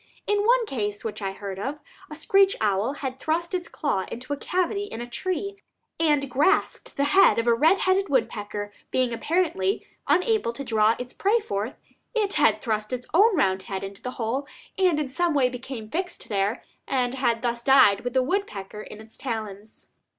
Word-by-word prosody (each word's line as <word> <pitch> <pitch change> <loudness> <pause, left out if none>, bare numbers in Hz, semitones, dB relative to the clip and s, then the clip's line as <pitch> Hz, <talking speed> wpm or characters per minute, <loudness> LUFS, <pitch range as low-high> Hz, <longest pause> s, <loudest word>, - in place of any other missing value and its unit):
In 415 +1 +1
one - - +4
case 210 - -3
which 215 -1 -5
I 195 -1 -2
heard 195 -1 -7
of, 275 +8 -3 0.3
a 305 - -7
screech 390 +4 +4
owl 210 +4 +1
had 260 0 -4
thrust 335 +5 -1
its 355 -2 -2
claw 235 - -2
into 255 +5 -4
a - - 0
cavity 370 +6 -1
in 320 - -7
a 240 - -4
tree, 375 +9 -3 0.4
and 295 -4 +2
grasped 300 +11 +1
the 280 - +2
head 300 +7 +5
of 230 - +1
a 235 - +5
red 315 +11 +4
headed 380 +1 +1
woodpecker; 210 -5 -1 0.2
being 255 -2 +1
apparently 300 - 0 0.2
unable 365 - +2
to 275 - -6
draw 220 -2 +3
its 250 0 -7
prey 420 +4 +2
forth, 215 - -3 0.4
it 415 -3 +1
had - - +3
thrust 215 -3 -2
its 250 -1 -3
own 410 +5 +5
round 190 - +2
head 190 0 -5
into 195 0 -7
the 250 - -4
hole, 250 +5 -2 0.3
and 365 -6 +3
in 300 - -1
some 340 +3 0
way 260 -3 +4
became 250 -2 -7
fixed 355 - -4
there, 205 +2 0 0.2
and 250 -2 0
had 240 -3 0
thus 235 -1 -1
died 265 -6 +6
with 245 0 -4
the 260 - +4
woodpecker 215 - -3
in 210 - -10
its 220 0 -13
talons. 215 -4 -6
255 Hz, 190 wpm, -25 LUFS, 215-350 Hz, 0.4 s, died